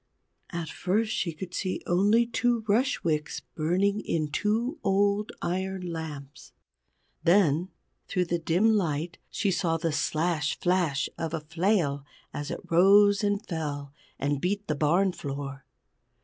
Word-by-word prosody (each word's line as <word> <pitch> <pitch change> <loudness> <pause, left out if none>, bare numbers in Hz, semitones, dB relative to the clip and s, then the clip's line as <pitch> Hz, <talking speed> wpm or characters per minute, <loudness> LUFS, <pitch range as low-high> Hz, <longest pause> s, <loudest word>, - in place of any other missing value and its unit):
At 170 -3 -4
first 210 +7 0
she 170 - -1
could 175 +3 -8
see 185 0 -2
only 205 +7 +3
two 235 -1 0
rush 240 +6 +2
wicks 155 -2 -1
burning 185 +6 +1
in 155 -7 -1
two 230 - 0
old 200 +1 +2
iron 190 +1 -2
lamps. 150 -4 -8 0.7
Then 175 -1 +3 0.4
through 180 -1 0
the 170 0 -1
dim 180 +7 +3
light 170 -4 -1
she 200 - 0
saw 170 -2 +1
the 165 0 -1
slash 155 0 0
flash 175 -6 +1
of 165 0 -2
a - - -2
flail 160 -2 0 0.3
as 145 0 -4
it - - -4
rose 200 +4 +6
and 205 0 0
fell, 145 -4 -4 0.2
and 140 0 -1
beat 200 +3 -1
the 155 - -1
barn 170 +6 +2
floor. 140 -4 -6
175 Hz, 140 wpm, -27 LUFS, 155-200 Hz, 0.7 s, rose